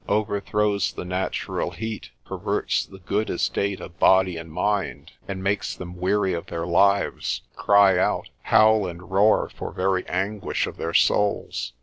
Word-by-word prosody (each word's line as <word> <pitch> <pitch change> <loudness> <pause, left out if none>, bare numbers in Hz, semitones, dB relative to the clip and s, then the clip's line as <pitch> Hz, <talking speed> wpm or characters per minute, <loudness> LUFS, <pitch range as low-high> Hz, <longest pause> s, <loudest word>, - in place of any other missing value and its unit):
Overthrows 100 -1 0
the - - -6
natural 90 +1 -2
heat, 110 -1 -6 0.2
perverts - - -1
the 95 - -13
good 100 +4 -2
estate 100 +2 -1
of 85 - -11
body 95 -2 +4
and 80 -1 -8
mind, 100 +4 -2 0.2
and 95 -1 -5
makes 100 +1 -1
them 90 0 -8
weary 95 0 +1
of 85 - -4
their 85 0 -4
lives, 100 +3 +1
cry 100 -2 +5
out, - - 0
howl 110 -2 +4
and 90 +1 -9
roar 100 +3 +4
for - - -6
very 95 0 0
anguish 100 +3 -1
of - - -8
their 85 - -3
souls. 100 -9 +1
95 Hz, 150 wpm, -24 LUFS, 90-100 Hz, 0.2 s, cry